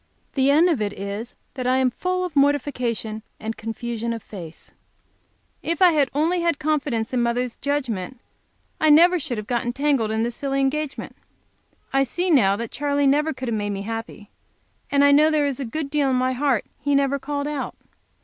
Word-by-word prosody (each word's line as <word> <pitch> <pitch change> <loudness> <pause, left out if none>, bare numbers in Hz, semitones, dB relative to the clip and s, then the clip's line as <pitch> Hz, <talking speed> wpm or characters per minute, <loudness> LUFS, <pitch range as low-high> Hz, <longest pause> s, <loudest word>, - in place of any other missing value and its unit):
The 270 0 +2
end 310 +5 +5
of 315 -10 +1
it 205 -1 -1
is 200 +4 -6 0.2
that 255 -2 -3
I 255 +1 +3
am 260 -1 +2
full 365 +7 -1
of 345 -4 -7
mortification 250 -6 0 0.2
and 220 +1 -4
confusion 230 +1 -4
of 230 - -7
face. 170 -6 -10 0.9
If 335 +1 -2
I 365 -2 +7
had 290 -4 +2
only 335 +4 +1
had 335 -3 +1
confidence 280 -7 -1
in 250 - +2
mother's 240 +1 -1
judgment 260 -6 -2 0.6
I 315 - +3
should 300 - +8
never 350 +3 +6
have 245 -8 -4
get 240 +1 0
entangled 260 -2 0
in 220 +1 0
this 235 0 -2
silly 275 -1 -2
engagement. 275 +1 -2 0.8
I 270 0 +4
see 350 +8 -1
now 200 -10 +5
that 230 +1 -5
Charley 285 0 0
never 295 +3 +3
could 260 -3 -5
have - - -1
made 205 -1 -2
me 200 -1 -3
happy, 225 -1 -6 0.6
and 280 0 +3
I 285 - +6
know 300 +2 +6
there 305 -2 +2
is 280 -2 -2
a 275 - -3
good 280 +4 -4
deal 290 -2 +2
in 260 - +2
my 255 +1 +1
heart 260 -3 +1
he 285 -1 +1
never 280 0 +2
called 285 +1 -3
out. 295 -2 -4
270 Hz, 195 wpm, -23 LUFS, 230-290 Hz, 0.9 s, should